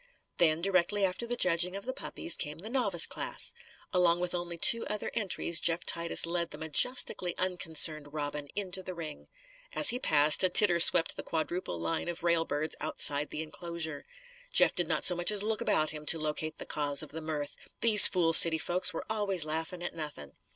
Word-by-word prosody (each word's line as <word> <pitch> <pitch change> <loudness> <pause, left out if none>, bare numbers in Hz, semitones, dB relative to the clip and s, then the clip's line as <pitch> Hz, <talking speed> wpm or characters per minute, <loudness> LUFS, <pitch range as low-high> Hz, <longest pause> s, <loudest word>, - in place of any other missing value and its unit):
Then, 160 -1 +1
directly 195 +1 0
after 190 +6 -5
the 245 - -3
judging 180 -3 0
of 200 - -8
the 260 - -5
puppies, 330 +5 -2
came 150 -1 -4
the 210 +7 -9
novice 205 -10 +2
class. - - -3 0.4
Along 175 -2 +1
with 180 0 -4
only 175 -1 -6
two 230 +7 +3
other 210 0 -5
entries, 190 -6 -2
Jeff 170 0 -2
Titus 170 0 +2
led 170 0 -3
the - - -10
majestically 175 - 0
unconcerned 160 -5 -1
Robin 145 -1 -5
into 190 -2 -5
the 185 0 -9
ring. 155 -3 -10 0.5
As 300 - +4
he 245 - -3
passed, 150 - +3
a 185 - +2
titter 180 -2 +6
swept 170 0 +5
the - - -5
quadruple 165 - -5
line 80 - -4
of 175 -1 -6
railbirds 165 -3 -2
outside 150 -1 -1
the 155 - -6
inclosure. 160 -1 -6 0.4
Jeff - - +3
did - - 0
not - - -3
so 180 - +3
much 175 0 +2
as 205 -1 +1
look 215 0 -3
about 155 0 -1
him 150 -1 -11
to - - +5
locate 155 0 -5
the - - -10
cause 145 -2 0
of - - -12
the 160 - -8
mirth. 150 -2 -6 0.3
These 220 -3 +9
fool 170 -3 -1
city 160 0 +8
folks 180 +3 +1
were - - -6
always 200 -6 -1
laughing 160 +3 -4
at 175 - -5
nothing. 150 - -8
170 Hz, 195 wpm, -28 LUFS, 155-185 Hz, 0.5 s, These